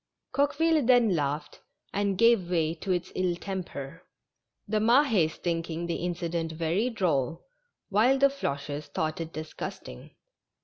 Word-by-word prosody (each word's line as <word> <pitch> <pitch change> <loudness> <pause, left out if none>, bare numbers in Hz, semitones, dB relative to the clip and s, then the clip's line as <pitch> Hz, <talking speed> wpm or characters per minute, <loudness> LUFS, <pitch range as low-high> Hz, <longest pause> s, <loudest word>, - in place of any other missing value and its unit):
Coqueville 300 +2 +2
then 240 -4 +5
laughed 145 0 -3 0.3
and 200 -1 0
gave 230 -6 +4
way 165 -3 +1
to 180 +3 -4
its 180 0 -1
ill 180 -2 0
temper 175 -5 -6 0.3
— - - -55
the 215 +1 +1
Mahes 225 - +4
thinking 165 -1 -2
the 170 - -2
incident 170 -1 -2
very 170 +9 0
droll, 165 - -1 0.4
while 230 +7 +4
the 275 +1 +5
Floches 145 - -4
thought 155 +3 -2
it 165 0 -5
disgust 155 0 -6
ing. 60 0 -11
175 Hz, 140 wpm, -28 LUFS, 160-220 Hz, 0.4 s, then